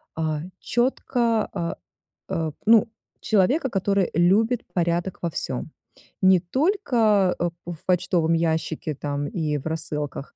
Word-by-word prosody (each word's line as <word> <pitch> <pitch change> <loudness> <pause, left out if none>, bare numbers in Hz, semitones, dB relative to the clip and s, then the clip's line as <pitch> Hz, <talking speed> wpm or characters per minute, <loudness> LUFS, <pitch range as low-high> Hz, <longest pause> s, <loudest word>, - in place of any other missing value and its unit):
а, 155 -2 -1 0.2
четко, 240 -2 0
а, 170 -1 -3 0.5
а, 160 -2 -1 0.2
ну, 225 -1 +6 0.3
человека, 245 - +2
который 195 -1 +1
любит 215 +8 +3
порядок 175 +1 -1
во 170 - -1
всём. 135 +3 -4 0.5
Не 190 -1 +6
только, 225 - +2
а, 175 0 -1 0.2
в 175 -2 -6
почтовом 170 -2 +2
ящике 160 -1 -1
там 145 +1 -3
и 155 -3 -2
в 135 - -9
рассылках, 150 -3 -4
175 Hz, 120 wpm, -24 LUFS, 160-215 Hz, 0.5 s, ну